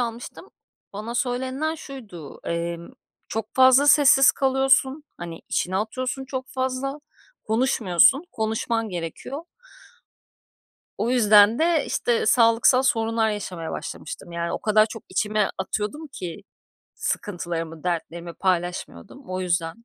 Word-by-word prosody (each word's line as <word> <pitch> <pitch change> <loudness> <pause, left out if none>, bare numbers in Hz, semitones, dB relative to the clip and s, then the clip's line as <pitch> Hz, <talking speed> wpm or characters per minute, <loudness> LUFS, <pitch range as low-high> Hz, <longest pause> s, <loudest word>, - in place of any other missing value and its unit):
almıştım. 240 +9 -5 0.4
Bana 215 +4 -6
söylenilen 260 +5 -1
şuydu, 220 - -10
emm, 170 0 -3 0.4
çok 220 -1 -5
fazla 260 +2 +6
sessiz 275 -2 +6
kalıyorsun, 270 +1 +2
hani, 170 -1 -8
içine 185 +1 -1
atıyorsun 255 +6 -3
çok 260 -1 -5
fazla, 260 +2 -3 0.5
konuşmuyorsun, 225 - +3
konuşman 225 +1 -1
gerekiyor. 180 - -6 1.6
O 235 - 0
yüzden 215 -2 +6
de, 330 -1 +2
işte, 235 -2 0
sağlıksal 230 +3 +5
sorunlar 225 -4 +1
yaşamaya 185 -6 -5
başlamıştım. 170 +2 -7
Yani 170 0 -3
o - - -2
kadar 215 0 +4
çok 225 0 -9
içime 210 +2 0
atıyordum 210 +11 -3
ki 185 -7 -7 0.5
sıkıntılarımı, 165 -4 -4
dertlerimi 170 -1 -4
paylaşmıyordum, 180 - -3
o 185 0 -2
yüzden. 175 +4 -2
220 Hz, 110 wpm, -24 LUFS, 180-260 Hz, 1.6 s, fazla